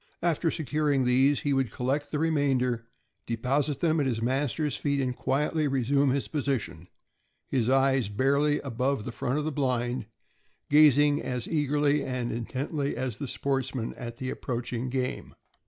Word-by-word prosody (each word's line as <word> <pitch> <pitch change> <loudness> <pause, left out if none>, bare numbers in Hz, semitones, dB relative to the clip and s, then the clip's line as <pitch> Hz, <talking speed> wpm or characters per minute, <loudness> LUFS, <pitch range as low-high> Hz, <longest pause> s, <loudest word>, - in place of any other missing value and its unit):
After 170 -1 +1
securing 150 -3 0
these, 135 +3 +3
he 145 -3 0
would 135 -3 +1
collect 135 +4 -1
the 150 - -1
remainder, 135 -7 +1 0.4
deposit 135 +5 0
them 160 -1 +2
at 140 - +1
his 120 -3 -1
master's 135 +5 0
feet, 140 -1 -1
and 130 -2 -1
quietly 150 +4 0
resume 135 +1 +2
his 135 +1 0
position; 135 - -3 0.6
his 125 -3 +1
eyes, 135 -4 +3
barely 140 +7 +2
above 130 -2 -1
the 125 - -4
front 125 +4 -2
of 150 - -1
the 155 - -1
blind, 125 -4 -1 0.6
gazing 145 0 +6
as 125 -2 -3
eagerly 145 -1 +1
and 125 -2 -2
intently 140 +5 -3
as 125 -5 -3
the 140 - -4
sportsman 135 -2 -2
at 120 -1 -7
the 130 +1 -3
approaching 125 0 -3
game. 130 0 -3
135 Hz, 155 wpm, -28 LUFS, 125-145 Hz, 0.6 s, gazing